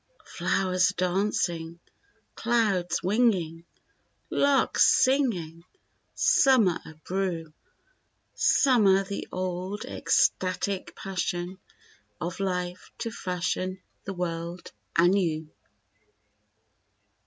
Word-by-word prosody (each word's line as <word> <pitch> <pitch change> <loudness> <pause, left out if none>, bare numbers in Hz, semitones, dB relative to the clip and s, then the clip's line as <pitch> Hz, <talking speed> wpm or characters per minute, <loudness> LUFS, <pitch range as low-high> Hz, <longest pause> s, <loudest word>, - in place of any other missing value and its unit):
Flowers 185 -1 +1
are - - -4
dancing, 175 -3 -1 0.5
clouds 205 -8 0
winging, 185 -6 +1 0.7
larks 280 -1 +3
singing, 235 - +1 0.5
summer 230 - +4
abrew 165 0 -4 0.8
Summer 205 -8 +4
the 200 +1 -5
old 185 +2 -4
ecstatic 185 +1 0
passion 180 -1 -3 0.6
of 170 +2 -4
Life 180 -2 -3
to 230 - -4
fashion 185 -1 -3 0.3
the 195 - -4
world 170 0 -4 0.3
anew. 170 -3 +2
185 Hz, 75 wpm, -27 LUFS, 175-200 Hz, 0.8 s, summer